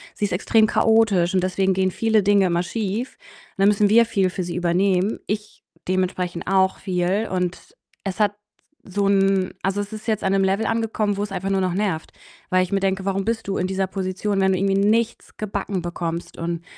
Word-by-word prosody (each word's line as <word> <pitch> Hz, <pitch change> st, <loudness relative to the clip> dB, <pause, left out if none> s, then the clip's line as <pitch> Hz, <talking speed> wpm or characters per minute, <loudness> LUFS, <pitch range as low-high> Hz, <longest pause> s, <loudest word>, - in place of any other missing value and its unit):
sie 210 Hz, -, -1 dB
ist 200 Hz, -, -3 dB
extrem 220 Hz, +4 st, +3 dB
chaotisch 220 Hz, -6 st, +3 dB
und 185 Hz, -1 st, +2 dB
deswegen 190 Hz, +1 st, +1 dB
gehen 190 Hz, 0 st, +1 dB
viele 220 Hz, 0 st, +2 dB
Dinge 200 Hz, -1 st, +4 dB
immer 170 Hz, 0 st, +1 dB
schief 220 Hz, +5 st, -3 dB, 0.4 s
und -, -, -20 dB
dann 195 Hz, -, +5 dB
müssen 205 Hz, 0 st, +3 dB
wir 235 Hz, +2 st, +6 dB
viel 195 Hz, -5 st, +1 dB
für 185 Hz, 0 st, -4 dB
sie 170 Hz, -1 st, -5 dB
übernehmen. 180 Hz, +3 st, +1 dB
Ich 210 Hz, 0 st, -5 dB, 0.3 s
dementsprechend 180 Hz, -2 st, -1 dB
auch 190 Hz, 0 st, +2 dB
viel 185 Hz, +3 st, 0 dB
und 180 Hz, -, -3 dB, 0.3 s
es 195 Hz, +1 st, -4 dB
hat 210 Hz, -2 st, +3 dB, 0.5 s
s 190 Hz, -, -15 dB
so 200 Hz, -, +2 dB
'n 195 Hz, -1 st, +2 dB
also, 195 Hz, +1 st, -1 dB
es 205 Hz, +2 st, -4 dB
ist 215 Hz, +1 st, -8 dB
jetzt 215 Hz, -2 st, 0 dB
an 190 Hz, -, +1 dB
'nem 195 Hz, 0 st, +3 dB
Level 195 Hz, +3 st, +1 dB
angekommen, 225 Hz, -2 st, 0 dB
wo's 205 Hz, 0 st, -3 dB
einfach 195 Hz, +1 st, -3 dB
nur 195 Hz, -, +1 dB
noch 185 Hz, -1 st, 0 dB
nervt, 190 Hz, -6 st, -2 dB, 0.4 s
weil 185 Hz, 0 st, +3 dB
ich 185 Hz, -, -6 dB
mir 195 Hz, -, +2 dB
denke: 190 Hz, 0 st, -1 dB
„Warum 195 Hz, 0 st, -1 dB
bist 225 Hz, -2 st, -2 dB
du 195 Hz, -, -1 dB
in 185 Hz, -, 0 dB
dieser 190 Hz, 0 st, -1 dB
Position, 195 Hz, +1 st, -2 dB
wenn 190 Hz, 0 st, +3 dB
du 185 Hz, -, +1 dB
irgendwie 195 Hz, +1 st, +1 dB, 0.2 s
nichts 230 Hz, +1 st, -1 dB
gebacken 200 Hz, -3 st, -3 dB
bekommst?“ 170 Hz, -1 st, -4 dB
Und 170 Hz, 0 st, -3 dB
195 Hz, 210 wpm, -22 LUFS, 185-210 Hz, 0.5 s, wir